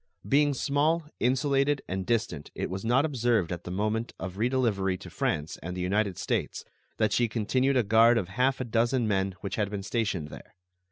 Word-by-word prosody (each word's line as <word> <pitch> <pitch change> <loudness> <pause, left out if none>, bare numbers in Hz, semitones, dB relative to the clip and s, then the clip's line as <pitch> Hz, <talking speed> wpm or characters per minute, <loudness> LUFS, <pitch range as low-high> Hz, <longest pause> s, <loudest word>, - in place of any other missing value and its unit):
Being 145 0 +3
small, 150 +5 +1 0.2
insulated, 140 +2 +1
and 95 0 -3
distant, 110 -11 -1
it - - -3
was 95 +1 -4
not 125 +6 +3
observed 120 - +1
at 85 -1 -5
the - - -5
moment 105 +5 -1
of 95 -1 -5
redelivery 110 -6 +1
to - - -10
France 75 +1 -2
and 90 +2 -5
the - - -3
United 100 +1 0
States - - -2 0.3
that 110 -2 +1
she 120 - +3
continued 130 +5 +1
a 125 - +3
guard 115 +3 +5
of 95 -6 -2
half 125 +6 +1
a 130 - -2
dozen 120 +1 +1
men 95 -2 0
which 100 -2 -4
had 105 -2 0
been 100 -1 -5
stationed 100 -9 -2
there. - - -12
115 Hz, 190 wpm, -28 LUFS, 95-130 Hz, 0.3 s, guard